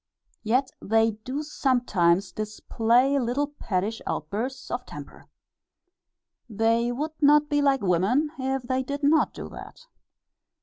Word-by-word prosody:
Yet 255 Hz, +4 st, +1 dB
they 225 Hz, +1 st, +2 dB
do 255 Hz, +8 st, -5 dB
sometimes 205 Hz, -, +1 dB
display 230 Hz, +5 st, +1 dB
little 250 Hz, +4 st, 0 dB
pettish 225 Hz, -6 st, -3 dB
outbursts 220 Hz, -, -4 dB
of -, -, -3 dB
temper. -, -, -11 dB, 1.2 s
They 230 Hz, +2 st, +1 dB
would 295 Hz, +6 st, -3 dB
not 295 Hz, +1 st, +5 dB
be 290 Hz, 0 st, +2 dB
like 275 Hz, -2 st, +2 dB
women 200 Hz, -, +2 dB
if 265 Hz, 0 st, -1 dB
they 255 Hz, +1 st, -1 dB
did 280 Hz, +3 st, -5 dB
not 310 Hz, +3 st, +3 dB
do -, -, -7 dB
that. -, -, -11 dB
245 Hz, 125 wpm, -26 LUFS, 220-280 Hz, 1.2 s, not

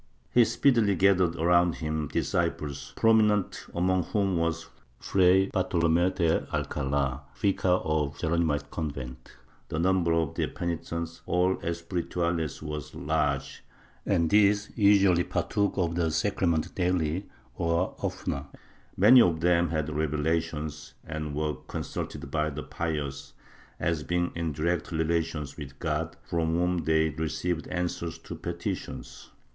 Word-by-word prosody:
He 120 Hz, -1 st, +6 dB
speedily 115 Hz, -6 st, +3 dB
gathered 95 Hz, -2 st, +3 dB
around 85 Hz, +1 st, +3 dB
him 80 Hz, -1 st, -2 dB
disciples, 70 Hz, 0 st, -2 dB
prominent 110 Hz, -3 st, +3 dB
among 90 Hz, 0 st, +1 dB
whom 100 Hz, -3 st, 0 dB
was 85 Hz, 0 st, -1 dB, 0.3 s
Fray 95 Hz, +3 st, +4 dB
Bartolome 85 Hz, -2 st, +2 dB
de 85 Hz, -3 st, 0 dB
Alcala, 70 Hz, -1 st, -1 dB
vicar 100 Hz, -1 st, 0 dB, 0.2 s
of 75 Hz, -2 st, 0 dB
the -, -, -12 dB
Geronimite 80 Hz, -3 st, 0 dB
convent; 70 Hz, -6 st, -6 dB, 0.4 s
the 80 Hz, -, -3 dB
number 90 Hz, 0 st, +2 dB
of 80 Hz, -3 st, 0 dB
their -, -, -1 dB
penitents, 85 Hz, -1 st, -4 dB
all 90 Hz, +1 st, +2 dB
espirituales 85 Hz, -2 st, -2 dB
was 75 Hz, -2 st, -6 dB
large, 80 Hz, +1 st, -1 dB, 0.4 s
and 85 Hz, -1 st, +1 dB
these 105 Hz, 0 st, +4 dB
usually 100 Hz, -4 st, +5 dB
partook 100 Hz, +2 st, -1 dB
of 85 Hz, -3 st, +1 dB
the 85 Hz, -1 st, +1 dB
sacrament 85 Hz, -1 st, 0 dB
daily 90 Hz, 0 st, 0 dB, 0.3 s
or 85 Hz, +2 st, 0 dB
oftener; 70 Hz, 0 st, -3 dB, 0.5 s
many 120 Hz, +7 st, +8 dB
of 85 Hz, -5 st, +3 dB
them 85 Hz, -1 st, +3 dB
had 80 Hz, -1 st, -2 dB
revelations 75 Hz, 0 st, -2 dB
and 75 Hz, -2 st, -4 dB
were 75 Hz, 0 st, 0 dB
consulted 70 Hz, -, -5 dB
by 75 Hz, 0 st, +1 dB
the 75 Hz, 0 st, -6 dB
pious 75 Hz, -4 st, -4 dB, 0.5 s
as 85 Hz, -2 st, 0 dB
being 85 Hz, +3 st, -1 dB
in 85 Hz, -1 st, -2 dB
direct 85 Hz, +5 st, -1 dB
relations 80 Hz, -2 st, -1 dB
with 70 Hz, -3 st, -8 dB
God, -, -, -2 dB
from 80 Hz, -1 st, -1 dB
whom 90 Hz, -1 st, 0 dB
they 80 Hz, 0 st, +3 dB
received 80 Hz, +2 st, -2 dB
answers 90 Hz, -2 st, -3 dB
to -, -, -9 dB
petitions. 85 Hz, +3 st, -6 dB
85 Hz, 130 wpm, -28 LUFS, 75-90 Hz, 0.5 s, many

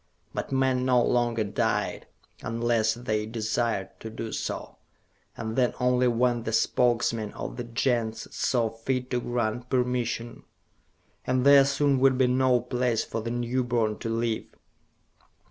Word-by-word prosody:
But -, -, -4 dB
men 130 Hz, -1 st, +2 dB
no 130 Hz, -1 st, +4 dB
longer 120 Hz, -2 st, +1 dB
died, 100 Hz, -, -1 dB, 0.3 s
unless 115 Hz, -1 st, +1 dB
they 110 Hz, -3 st, -2 dB
desired 110 Hz, -2 st, -1 dB
to 110 Hz, -, -7 dB
do 110 Hz, 0 st, -6 dB
so, -, -, -5 dB, 0.6 s
and 110 Hz, -1 st, -4 dB
then 125 Hz, -1 st, +2 dB
only 125 Hz, 0 st, +3 dB
when 120 Hz, 0 st, +2 dB
the 110 Hz, 0 st, -4 dB
Spokesmen 115 Hz, -2 st, +1 dB
of -, -, -6 dB
the 120 Hz, -, -5 dB
Gens 115 Hz, -1 st, -1 dB
saw 115 Hz, -3 st, +1 dB
fit 125 Hz, +3 st, -3 dB
to 125 Hz, -1 st, 0 dB
grant 120 Hz, 0 st, -2 dB
permission; 125 Hz, -2 st, -1 dB, 0.9 s
and 130 Hz, 0 st, +1 dB
there 140 Hz, -1 st, +8 dB
soon 140 Hz, -1 st, +2 dB
would 130 Hz, -1 st, +4 dB
be 130 Hz, -, +4 dB
no 125 Hz, 0 st, +3 dB
place 125 Hz, -2 st, 0 dB
for 115 Hz, -, -4 dB
the 115 Hz, -, -4 dB
newborn 120 Hz, -2 st, -1 dB
to 115 Hz, -, -4 dB
live. 115 Hz, 0 st, -1 dB
120 Hz, 145 wpm, -27 LUFS, 115-125 Hz, 0.9 s, there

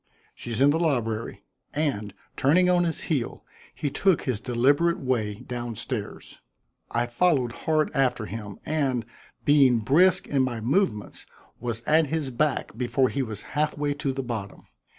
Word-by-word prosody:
"She's 115 Hz, -1 st, -5 dB
in 140 Hz, +2 st, +6 dB
the 160 Hz, -, +1 dB
library." 115 Hz, -9 st, -1 dB, 0.3 s
And, 115 Hz, -10 st, -1 dB, 0.2 s
turning 180 Hz, +7 st, +4 dB
on 175 Hz, -1 st, +3 dB
his 165 Hz, -, -2 dB
heel, 140 Hz, -8 st, -2 dB, 0.3 s
he 145 Hz, -, -2 dB
took 185 Hz, +3 st, +2 dB
his 125 Hz, -6 st, -1 dB
deliberate 140 Hz, +9 st, +2 dB
way 115 Hz, -6 st, -1 dB
down 120 Hz, -2 st, -5 dB
stairs. -, -, -6 dB, 0.5 s
I 120 Hz, +1 st, 0 dB
followed 125 Hz, -1 st, +1 dB
hard 155 Hz, +5 st, 0 dB
after 125 Hz, -5 st, +1 dB
him, 105 Hz, -2 st, -7 dB
and, 135 Hz, -7 st, 0 dB, 0.4 s
being 140 Hz, -4 st, +5 dB
brisk 155 Hz, -, +3 dB
in 140 Hz, -2 st, +1 dB
my 125 Hz, -3 st, -1 dB
movements, 120 Hz, -, -1 dB, 0.3 s
was 115 Hz, -1 st, -4 dB
at 155 Hz, +3 st, +3 dB
his 150 Hz, -2 st, -2 dB
back 135 Hz, -2 st, -1 dB
before 125 Hz, +2 st, +1 dB
he 140 Hz, -, -1 dB
was 110 Hz, -5 st, -5 dB
half 150 Hz, 0 st, 0 dB
way 145 Hz, 0 st, 0 dB
to 145 Hz, -1 st, -2 dB
the 135 Hz, 0 st, -3 dB
bottom. 110 Hz, -5 st, -6 dB
130 Hz, 155 wpm, -26 LUFS, 115-150 Hz, 0.5 s, in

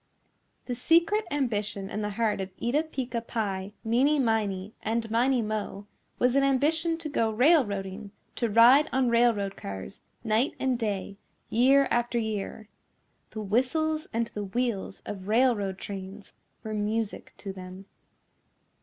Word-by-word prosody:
The 250 Hz, -, -3 dB
secret 335 Hz, -, +3 dB
ambition 210 Hz, -8 st, -1 dB
in 210 Hz, +2 st, -4 dB
the 210 Hz, -, -2 dB
heart 220 Hz, -4 st, +1 dB
of 190 Hz, -, -4 dB
Eeta 260 Hz, +6 st, +1 dB
Peeca 255 Hz, -5 st, -3 dB
Pie, 200 Hz, -4 st, -3 dB
Meeney 260 Hz, +7 st, +3 dB
Miney, 215 Hz, -5 st, 0 dB
and 225 Hz, +1 st, -1 dB
Miney 245 Hz, +1 st, +2 dB
Mo 210 Hz, -2 st, -4 dB, 0.3 s
was 250 Hz, +1 st, +2 dB
an 275 Hz, -, +4 dB
ambition 315 Hz, +5 st, +2 dB
to 330 Hz, -2 st, -6 dB
go 230 Hz, -6 st, +1 dB
railroading, 215 Hz, -, +2 dB, 0.3 s
to 235 Hz, -, 0 dB
ride 240 Hz, +7 st, +6 dB
on 260 Hz, -1 st, +2 dB
railroad 230 Hz, -4 st, +2 dB
cars 95 Hz, -, -7 dB, 0.2 s
night 225 Hz, +4 st, +1 dB
and 260 Hz, -2 st, 0 dB
day, 200 Hz, -3 st, -3 dB, 0.3 s
year 270 Hz, +4 st, +5 dB
after 240 Hz, 0 st, +1 dB
year. 215 Hz, -1 st, -3 dB, 0.6 s
The 215 Hz, -, -6 dB
whistles 310 Hz, +9 st, 0 dB
and 230 Hz, 0 st, 0 dB
the 205 Hz, -1 st, -4 dB
wheels 210 Hz, -2 st, -2 dB
of 195 Hz, -2 st, -7 dB
railroad 215 Hz, -4 st, +2 dB
trains 195 Hz, 0 st, -8 dB, 0.3 s
were 220 Hz, -, -4 dB
music 215 Hz, +1 st, -2 dB
to 195 Hz, -, -6 dB
them. 185 Hz, +1 st, -10 dB
225 Hz, 140 wpm, -28 LUFS, 205-255 Hz, 0.6 s, ride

